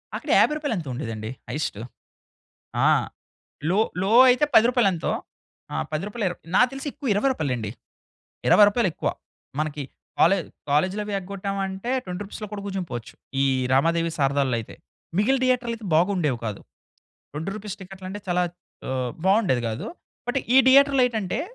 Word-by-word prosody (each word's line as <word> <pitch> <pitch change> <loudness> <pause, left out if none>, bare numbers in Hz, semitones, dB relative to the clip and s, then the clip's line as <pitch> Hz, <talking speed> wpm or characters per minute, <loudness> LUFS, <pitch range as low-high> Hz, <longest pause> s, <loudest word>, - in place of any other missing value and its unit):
అక్కడ - - -6
50 - - +4
రూపాయలో 290 -6 -2
ఎంతో 160 -6 -5
ఉండేదండి? 110 -4 -5 0.2
హైయెస్టూ 145 -8 -3 1.0
ఆ! - - +5 0.8
లో, 190 +4 +2 0.2
లో 195 +2 0 0.2
అయితే 255 +4 +4
10 220 - +8
రూపాయలు 245 -5 +3
ఎంతో? 165 - -2 0.6
ఆ - - -3 0.2
10 155 +3 -2
రూపాయలో 210 0 -3
ఇర్ 175 - -6 0.2
నాకు 250 +4 +5
తెలిసి 270 +2 -6
ఎక్కువ 285 0 -7
20 205 +7 +1
రూపాయలే 150 - -1
అండి. 110 -3 -4 0.8
20 210 - +8
రూపాయలెక్కువ. 205 -6 0 0.5
మనకి 150 -1 -2 0.4
కాలే 195 +4 +5 0.3
కాలేజ్‌లవి 190 +8 +1
ఎగ్గొట్టామంటే 195 +2 -4
20 180 +1 -5
రూపీస్‌లో 210 +2 -7
కూడా 205 -1 -5
కూర్చుండిపోవచ్చు 180 - -5 0.3
ఈ - - +4 0.3
'రమాదేవి', 165 +5 +2
'శారదాలలో' 135 -3 +1
అయితే. 110 - -10 0.4
మిగిలిన 260 +6 +3
థియేటర్లయితే 240 -3 0
బాగుండేవి 165 -6 +2
కాదు. 105 -2 -4 0.7
20 160 +6 -4
రూపీస్ 210 -2 -6
టికెట్లంటే 190 +1 -8
చాలా 180 0 +2 0.5
ఆహ్, 130 -2 -1 0.2
బావుండేది 190 - +3
గాదు. 110 0 -4 0.4
బట్ 270 - +1 0.2
ఈ - - +9
థియేటర్‌‌లో 275 0 +6
ఏంటంటే 220 -4 -2
190 Hz, 145 wpm, -24 LUFS, 150-220 Hz, 1.0 s, ఈ